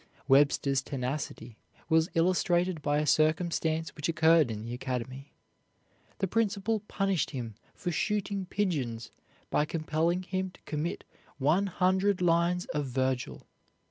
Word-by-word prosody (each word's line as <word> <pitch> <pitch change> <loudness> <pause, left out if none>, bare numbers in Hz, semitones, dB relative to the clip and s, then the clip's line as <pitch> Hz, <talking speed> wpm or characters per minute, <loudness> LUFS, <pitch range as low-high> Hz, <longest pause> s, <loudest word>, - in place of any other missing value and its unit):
Webster's 135 0 +4
tenacity 125 -4 -5 0.3
was 160 +1 +3
illustrated 175 0 +2
by 145 0 +1
a 150 - +1
circumstance 160 +1 +1
which 150 +1 -3
occurred 160 -3 +4
in 110 -1 -5
the 115 +1 -5
academy. 130 +2 -5 0.9
The - - 0
principal 215 +1 0
punished 195 -4 0
him 120 -6 -5 0.2
for 180 -3 -3
shooting 200 +1 -1
pigeons 140 - -2 0.4
by 150 - +2
compelling 165 +3 0
him 185 0 -2
to - - -21
commit 155 +2 -3 0.3
one 155 +9 +2
hundred 190 +2 +2
lines 175 +1 +2
of 145 -2 -1
Vergil. 130 0 -2
160 Hz, 125 wpm, -29 LUFS, 135-180 Hz, 0.9 s, Webster's